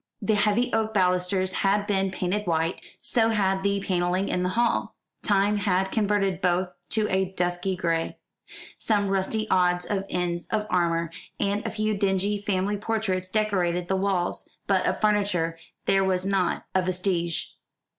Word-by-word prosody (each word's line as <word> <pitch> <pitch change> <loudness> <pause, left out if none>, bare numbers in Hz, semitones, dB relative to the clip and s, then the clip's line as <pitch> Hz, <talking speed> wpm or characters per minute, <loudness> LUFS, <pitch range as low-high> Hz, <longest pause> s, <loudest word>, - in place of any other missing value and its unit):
The 215 +1 +1
heavy 210 +3 +2
oak 220 -1 0
balusters 185 0 +2
had 200 +2 +1
been 195 -2 +1
painted 190 +2 -2
white, 165 +1 0 0.2
so 225 -2 +3
had 195 -3 +1
the 200 0 +1
panelling 180 0 0
in 180 - 0
the 180 - 0
hall. 235 +4 0 0.3
Time 205 0 +2
had 190 -2 +1
converted 200 -3 +1
both 180 0 +1 0.2
to 215 -1 +1
a 190 0 +2
dusky 180 0 -1
gray. 165 -2 -1 0.6
Some 205 -3 +1
rusty 195 +3 0
odds 180 -1 +3
and 195 -2 -1
ends 175 -1 -2
of 215 -1 -1
armour, 170 -2 +1 0.3
and 200 +1 0
a - - -1
few 215 0 -1
dingy 200 +1 0
family 200 0 0
portraits 200 -4 -1
decorated 180 -5 0
the 190 - +2
walls; 190 -2 0 0.2
but 190 -2 +2
of - - 0
furniture 200 -6 +1 0.3
there 195 0 +3
was 185 -1 +1
not 195 -3 0
a 185 - +3
vestige. 180 -2 -1
190 Hz, 155 wpm, -26 LUFS, 180-205 Hz, 0.6 s, so